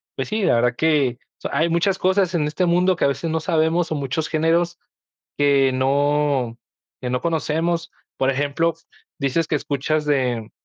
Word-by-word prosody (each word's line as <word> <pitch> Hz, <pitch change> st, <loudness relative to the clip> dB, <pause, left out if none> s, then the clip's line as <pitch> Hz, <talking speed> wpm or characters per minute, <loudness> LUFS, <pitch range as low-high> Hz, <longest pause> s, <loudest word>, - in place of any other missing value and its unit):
pues -, -, -4 dB
sí, 215 Hz, -1 st, -1 dB
la 120 Hz, -, +3 dB
verdad 120 Hz, +1 st, +2 dB
que, 145 Hz, -6 st, +2 dB
o -, -, -42 dB
sea, -, -, -4 dB
hay 155 Hz, +4 st, +2 dB
muchas 170 Hz, +3 st, +1 dB
cosas 185 Hz, -1 st, +2 dB
en 150 Hz, -3 st, +1 dB
este 160 Hz, +5 st, 0 dB
mundo 180 Hz, +2 st, +3 dB
que -, -, -2 dB
a -, -, +5 dB
veces 140 Hz, +4 st, -3 dB
no 160 Hz, 0 st, 0 dB
sabemos, 160 Hz, +1 st, +1 dB
o, -, -, 0 dB
muchos 140 Hz, +2 st, -2 dB
géneros 170 Hz, +2 st, +1 dB, 0.6 s
que 140 Hz, -2 st, +3 dB
no 135 Hz, -2 st, +1 dB, 0.4 s
que 125 Hz, -, -4 dB
no 125 Hz, 0 st, -1 dB
conocemos, 165 Hz, +1 st, -1 dB, 0.2 s
por 135 Hz, 0 st, +1 dB
ejemplo, 145 Hz, +5 st, 0 dB, 0.4 s
dices 140 Hz, +4 st, 0 dB
que -, -, -2 dB
escuchas 150 Hz, +1 st, -1 dB
de 125 Hz, -6 st, 0 dB
150 Hz, 180 wpm, -21 LUFS, 135-165 Hz, 0.6 s, a